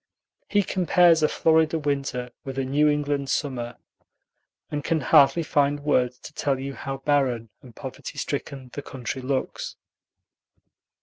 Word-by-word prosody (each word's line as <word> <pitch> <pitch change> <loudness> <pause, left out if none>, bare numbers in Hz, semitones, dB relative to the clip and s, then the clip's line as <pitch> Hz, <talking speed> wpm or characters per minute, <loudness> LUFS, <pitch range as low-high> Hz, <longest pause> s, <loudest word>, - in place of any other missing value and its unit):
He 205 -1 +3
compares 175 -3 +4
a 155 - +5
Florida 160 0 +3
winter 140 -4 -2
with 135 -1 -6
a 135 - 0
New 145 +3 +3
England 145 -2 0
summer, 125 -5 -2 0.9
and 145 -1 -2
can 160 +1 0
hardly 145 +3 +5
find 145 -1 +1
words 125 -4 +1
to 150 - -10
tell 140 -3 0
you 135 +1 -4
how 135 0 -5
barren 135 -5 0
and 120 -3 -15
poverty - - -8
stricken 130 -3 -4
the 145 - -4
country 130 -1 -5
looks. 130 +1 -3
140 Hz, 140 wpm, -25 LUFS, 130-150 Hz, 0.9 s, a